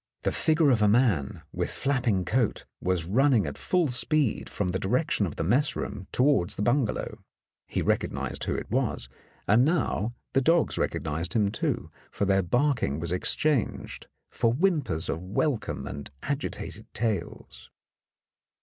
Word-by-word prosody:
The - - +1
figure 155 -2 +3
of 115 -4 +2
a 105 - +5
man 105 - +2
with - - -2
flapping 120 -9 0
coat 120 -2 0 0.2
was 90 -3 0
running 125 +4 +3
at - - -4
full 180 -5 +1
speed 125 +1 0
from 100 -3 -2
the 95 +1 -1
direction 110 -1 +1
of 80 - -7
the - - -2
mess 125 - +3
room 95 - -5
towards 130 -9 +2
the 105 - -2
bun 120 +3 +3
galow. - - -5 0.5
He - - -2
recognized - - -1
who - - -1
it - - -5
was, 60 - -1 0.4
and 110 +5 +5
now 130 - 0 0.2
the 135 - +3
dogs 165 +4 +2
recognized 80 +3 -2
him, 105 -3 +2
too, - - -2 0.2
for 100 - -2
their 95 0 +3
barking 120 - +1
was 85 +1 -3
exchanged 130 +7 +1 0.2
for 115 - +1
whimpers 150 - +1
of 80 - -2
welcome 110 - -1
and 70 +2 -7
agitated 140 +1 -4
tails. 110 -6 -3
115 Hz, 155 wpm, -27 LUFS, 95-140 Hz, 0.5 s, a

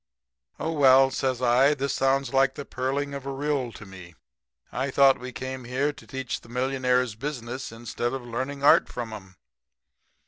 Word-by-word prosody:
"'Oh, 160 - -2
well,' 135 -3 +5
says 130 -1 -1
I, 130 +5 +4
'this 140 -1 -2
sounds 135 -1 +1
like 135 0 +3
the 145 - -6
purling 135 +3 -2
of 140 -1 -6
a - - -2
rill 135 -3 -1
to 105 - -11
me. 90 -3 -12 0.6
I 135 +2 -2
thought 135 0 +5
we 125 0 -7
came 130 0 -6
here 135 +4 -1
to - - -16
teach 135 -2 -4
the - - -17
millionaires 125 -1 0
business, 125 0 -5
instead 120 +1 -4
of 135 -2 -5
learning 130 +4 -4
art 145 - +6
from 115 -2 -5
'em?' 95 -3 -10
130 Hz, 175 wpm, -26 LUFS, 120-135 Hz, 0.6 s, art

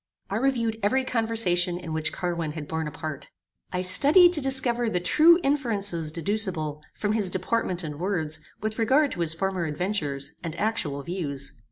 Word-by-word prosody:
I 200 - 0
reviewed 230 -3 0
every 260 +6 +1
conversation 220 -8 +1
in 170 -3 -7
which 160 0 -1
Carwin 170 -4 -3
had 150 -2 -7
borne 160 0 -3
a - - -6
part. 155 -1 -7 0.4
I 180 0 -2
studied 295 - +6
to 305 - +1
discover 255 -3 +2
the 180 - 0
true 325 - +5
inferences 205 - 0
deducible 165 -4 -1
from 205 - -2
his 210 -4 +2
deportment 185 -1 -2
and 150 -2 -6
words 160 -5 -2 0.2
with 215 +2 -4
regard 270 +6 +3
to - - -7
his 165 -1 +1
former 190 0 -2
adventures 150 -4 -2
and 165 -2 -6
actual 165 -10 -1
views. 145 -6 -4
185 Hz, 170 wpm, -25 LUFS, 160-230 Hz, 0.4 s, studied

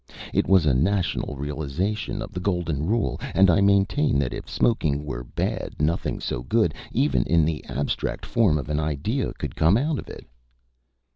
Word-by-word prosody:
It - - +2
was 95 -4 +5
a 70 - +4
national 90 +2 0
realization 80 - -3
of 110 - -9
the 90 - -4
golden 85 -5 -1
rule, 105 - 0
and 95 -1 +6
I 85 - +3
maintain 100 - +3
that 70 -3 0
if - - -7
smoking 75 -11 +1
were 65 -4 -5
bad - - -3
nothing 75 +3 0
so - - -3
good, 105 - +1 0.2
even 140 +5 +2
in 85 -2 +3
the 80 -1 -2
abstract 70 +2 -3
form 100 -10 +2
of 70 - -4
an 75 0 0
idea, 80 - -1
could - - -6
come 80 +6 +4
out 145 +3 0
of - - -9
it." - - -10
85 Hz, 180 wpm, -24 LUFS, 75-105 Hz, 0.2 s, and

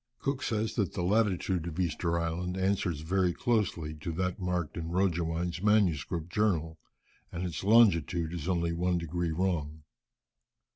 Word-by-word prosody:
Cook 140 -1 -2
says 110 -1 -1
that 100 -6 0
the 90 - -2
latitude 95 -3 +1
of 85 +1 -5
Easter 85 0 0
Island 85 +2 -2
answers 95 -5 0
very 90 +2 +1
closely 95 -10 0
to 80 +3 -4
that 90 +2 -2
marked 90 -4 -2
in 80 -1 -4
Roggewein's 85 -1 0
MS. 100 -10 +3 0.2
journal, 85 -6 0 0.5
and 85 - -4
its 85 0 -4
longitude 90 -6 +4
is 85 -2 -5
only 85 -2 +1
one 90 +1 +1
degree 85 0 -2
wrong. 80 -3 -2
90 Hz, 145 wpm, -30 LUFS, 85-95 Hz, 0.5 s, longitude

